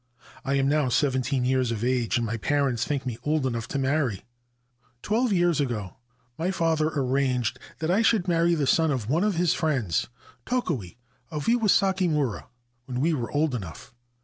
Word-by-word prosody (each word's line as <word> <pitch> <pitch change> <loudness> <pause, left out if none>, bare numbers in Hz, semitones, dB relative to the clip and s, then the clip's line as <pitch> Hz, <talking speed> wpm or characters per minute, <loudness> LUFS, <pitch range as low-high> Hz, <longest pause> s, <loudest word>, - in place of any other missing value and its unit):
I 140 - 0
am 135 0 +2
now 145 -2 +2
seventeen 130 -1 +1
years 130 -1 +1
of 115 -1 -3
age, 125 -1 +1
and 120 - -1
my 115 +1 -2
parents 135 -1 0
think 140 -2 -2
me 120 -3 -4
old 150 -2 0
enough 115 -3 -2
to - - -3
marry. 135 -6 0 0.8
Twelve 230 +3 +1
years 175 -5 +2
ago 110 -8 -3 0.4
my 170 +3 0
father 165 -4 +1
arranged 130 -4 0 0.2
that 160 +1 -1
I 200 +5 +3
should 220 -5 +2
marry 170 0 +3
the 150 -3 0
son 160 +4 +3
of 130 -7 -2
one 165 +6 +2
of 210 -3 +1
his 175 0 +2
friends, 130 - 0 0.4
Tokue, 150 - -2 0.3
of 150 -2 -4
Iwasakimura, 190 - +2 0.4
when 125 -1 -4
we 160 +5 +2
were 120 -6 -3
old 150 -1 +1
enough. 100 -2 -7
140 Hz, 175 wpm, -26 LUFS, 125-165 Hz, 0.8 s, I